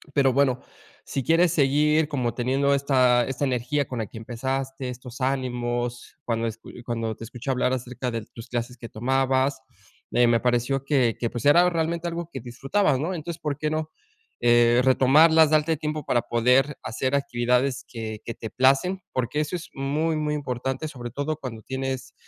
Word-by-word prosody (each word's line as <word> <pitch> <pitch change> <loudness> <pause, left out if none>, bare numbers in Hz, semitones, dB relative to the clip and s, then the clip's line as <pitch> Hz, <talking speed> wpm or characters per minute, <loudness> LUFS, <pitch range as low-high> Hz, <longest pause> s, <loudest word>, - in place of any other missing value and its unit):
Pero 135 -2 +4
bueno, 130 -2 +2 0.5
si 135 - -3
quieres 165 +4 +4
seguir 150 +2 +3
como 125 -5 -1
teniendo 135 +3 +1
esta 130 -3 +3
esta 135 +1 -2
energía 130 +3 0
con 125 - -5
la 110 - -2
que - - -11
empezaste, 130 +3 -4
estos 125 +1 -9
ánimos 120 -2 -2
cuando 115 -1 -1
es 110 -1 -5
cu - - -14 0.2
cuando 115 -2 -2
te - - -10
escuché 125 +3 -5
hablar 130 0 +1
acerca 125 0 -4
de 115 -2 -4
tus 115 - -10
clases 125 +1 -3
que 115 -1 -9
tomabas, 130 +3 +1 0.5
eh, 120 0 +4
me 115 0 +3
pareció 125 +3 0
que 130 -6 +2
que, 120 - -1
pues, 120 +3 -6
era 175 +5 +6
realmente 170 0 -1
algo 170 0 -4
que 135 - -5
disfrutabas, 135 - 0
¿no?, 165 +6 -2
entonces 170 -1 -6
por 145 -2 -2
qué 155 +1 -1
no, 155 0 -3 0.5
eh, 120 0 +5
retomarlas, 150 +5 +5
darte 155 +1 +2
tiempo 150 0 -3
para 120 - +1
poder 125 +5 +2
hacer 130 +4 -1
actividades 125 0 0
que 110 -2 -6
que 115 - -4
te 110 - -7
placen, 135 - +2
porque 130 +4 -1
eso 155 +3 -1
es 175 - -7
muy 150 +4 -1
muy 150 -1 -1
importante, 135 0 -3
sobre 120 -5 -7
todo 145 +4 -2
cuando 125 -7 -7
tienes, 130 +1 -4
130 Hz, 180 wpm, -25 LUFS, 120-150 Hz, 0.5 s, era